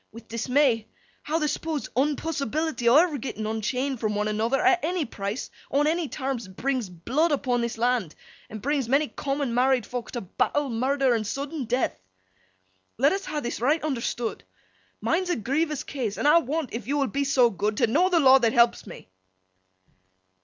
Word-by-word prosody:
—with 230 0 -12
dismay—how 250 +4 -1
th' 305 -2 0
supposed 300 0 -3
unpossibility 295 0 -1
o' 240 - +5
ever 310 -2 +4
getting 220 -3 -5
unchained 250 +5 -2
from 215 -2 -1
one 210 +1 0
another, 225 +5 0
at 375 -3 +3
any 345 0 0
price, 205 +1 -5 0.2
on 285 +2 +2
any 325 +1 +1
terms, 260 -6 -4
brings 245 +3 -2
blood 255 - 0
upon 255 -4 0
this 235 -1 -3
land, 235 -8 0 0.3
and 215 -1 -8
brings 280 -4 0
many 285 +3 +3
common 275 -3 -2
married 255 0 +3
fok 245 -2 -5
to 240 - -4
battle, 280 +9 -1
murder, 260 +2 +1
and 220 -3 -1
sudden 280 +3 -4
death. 250 +3 0 1.0
Let 275 +5 +4
us 390 0 -3
ha' 300 -1 -3
this, 240 -1 -4
right 295 +6 +2
understood. 240 -5 -3 0.6
Mine's 360 +2 0
a 350 - +2
grievous 285 +6 -1
case, 240 -8 -4
an' - - -2
I 300 +3 +7
want—if 270 -7 -4
yo 285 +2 0
will 280 - +2
be 280 +1 -1
so 255 -4 +3
good—t' 210 +5 0
know 320 +11 +2
the 350 -2 +3
law 270 -2 +7
that 230 -3 +2
helps 235 -2 +3
me. 175 - -11
265 Hz, 175 wpm, -26 LUFS, 230-295 Hz, 1.0 s, I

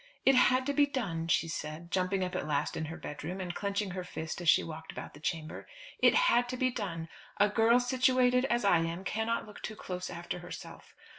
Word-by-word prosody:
"It 270 - +7
had 255 0 +4
to 285 - 0
be 285 0 +4
done," 180 -13 -2
she 170 - +2
said, 155 +2 -6
jumping 185 +1 +1
up 180 - -3
at - - -2
last 145 -2 0
in 160 - -2
her 160 +3 -6
bedroom, 160 +3 -6
and 180 -2 -4
clenching 200 0 -2
her 185 0 -4
fist 160 -1 -5
as 170 - +2
she - - +6
walked 160 0 -7
about - - -8
the 145 - -13
chamber. 155 0 -4 0.3
"It - - +5
had 245 - +4
to 255 - -3
be 255 0 +1
done. 175 -9 -4 0.3
A 205 +1 +5
girl 225 +3 +4
situated 255 0 +3
as 240 -5 +1
I 175 -4 +5
am 165 +3 -2
cannot 220 +4 -1
look 210 - -12
too 215 - -5
close 180 -3 -5
after 175 +1 -5
herself. 175 0 -10
190 Hz, 220 wpm, -31 LUFS, 165-245 Hz, 0.3 s, It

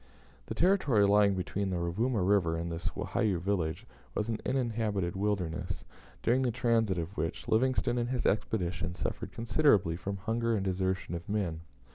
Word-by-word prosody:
The - - -4
territory 155 - +4
lying 100 0 +4
between 95 +2 -2
the 90 - -1
Rovuma 100 +6 0
River 90 -4 +2
and 85 +1 -3
this 85 +1 -2
Wahiyou 100 -5 0
village 90 -3 -1 0.3
was 105 +2 -1
an 110 -1 -1
uninhabited 110 -8 0
wilderness, 95 -5 -2 0.4
during 125 +3 +3
the 130 - +2
transit 115 -5 +1
of 85 +4 -4
which 80 -3 -3
Livingstone 120 +1 +2
and 120 0 -1
his 125 -1 -1
expedition 90 -4 0
suffered - - -4
considerably 115 - +3
from 100 +3 -4
hunger 115 +3 0
and 100 -2 -1
desertion 95 -1 -1
of 85 +2 -6
men. 95 -6 -1
100 Hz, 160 wpm, -31 LUFS, 90-115 Hz, 0.4 s, territory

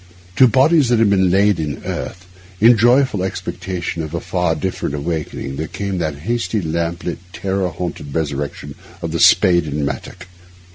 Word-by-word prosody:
To 130 - +7
bodies 135 +2 +4
that 120 - +3
had 110 -2 +3
been 95 -2 +3
laid 100 0 +3
in 75 -3 -3
earth, 90 -1 -5 0.3
in 115 +3 +7
joyful 120 -1 +3
expectation 90 -2 -4
of 80 +1 -5
a - - -1
far 90 -2 -1
different 80 -3 -3
awakening, 75 -3 -4
there 80 +2 -3
came 100 0 -4
that 80 -4 -2
hasty, 115 -1 -1
lamp 85 0 -2
lit, 85 - -4
terror 95 -1 -1
haunted 80 -4 -6
resurrection 75 -3 -3 0.3
of - - -3
the - - -2
spade 85 -2 +5
and 75 -1 -2
mattock. 90 +5 -6
90 Hz, 165 wpm, -19 LUFS, 80-100 Hz, 0.3 s, To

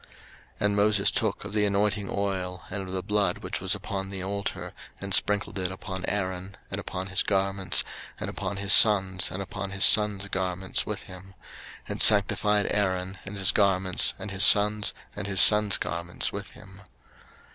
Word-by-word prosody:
03:008:030 - - -24 0.6
And 100 0 +1
Moses 105 0 +2
took - - -3
of 100 - -8
the 105 -1 +1
anointing 100 0 -1
oil, 95 -3 -4
and 100 - -4
of - - -8
the 95 -1 -4
blood 100 -2 -1
which - - -5
was - - -1
upon 95 -1 -6
the 95 -1 -6
altar, 100 +1 -5 0.3
and 100 -1 -4
sprinkled 100 -1 +1
it 90 0 -2
upon 95 0 -7
Aaron, 95 -1 -4
and - - -4
upon 90 +1 -6
his 95 - +1
garments, 95 -1 -1 0.4
and - - -5
upon 100 - -6
his 100 0 +3
sons, 95 -3 +4
and 95 +2 -6
upon 100 0 -7
his 95 0 +2
sons' 105 -2 +4
garments 95 0 -3
with - - -5
him; 95 +1 -14 0.5
and - - -4
sanctified 105 0 +5
Aaron, 95 -2 -2
and 100 +1 -7
his 95 -1 +3
garments, 95 -3 +2
and 100 - -7
his 95 0 +3
sons, 105 0 +4 0.2
and 100 -1 -6
his 95 -2 -2
sons' 105 -1 +7
garments 85 +1 -4
with - - -7
him. 95 +1 -16
100 Hz, 180 wpm, -26 LUFS, 95-100 Hz, 0.6 s, sons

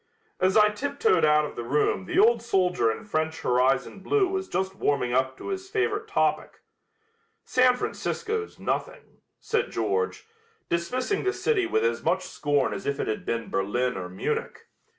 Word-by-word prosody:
As 190 +3 +3
I 210 0 +6
tiptoed 285 - +1
out 150 0 +4
of - - -8
the 120 - -4
room 120 -7 +1
the - - -3
old 230 +3 +5
soldier 180 - +2
in 165 - -7
French 160 -5 -2
horizon 130 +8 +1
blue 390 - +2
was 380 0 -3
just 190 - -2
warming 140 -8 0
up 130 +1 +1
to - - -7
his 380 -1 -4
favorite 425 +1 -1
topic. 410 - 0 0.8
"San 255 0 +4
Francisco's 435 - -3
nothing," - - -4 0.2
said 455 - -1
George, 440 +3 -1 0.4
dismissing 250 - -1
the 385 0 +1
city 390 -6 +1
with 440 +5 +1
as 470 - 0
much - - +1
scorn 145 -2 0
as - - -6
if 140 0 -1
it - - -1
had 110 - -3
been 115 -1 -2
Berlin 120 +6 0
or 90 -1 -5
Munich. 95 - -3
195 Hz, 170 wpm, -26 LUFS, -, 0.8 s, I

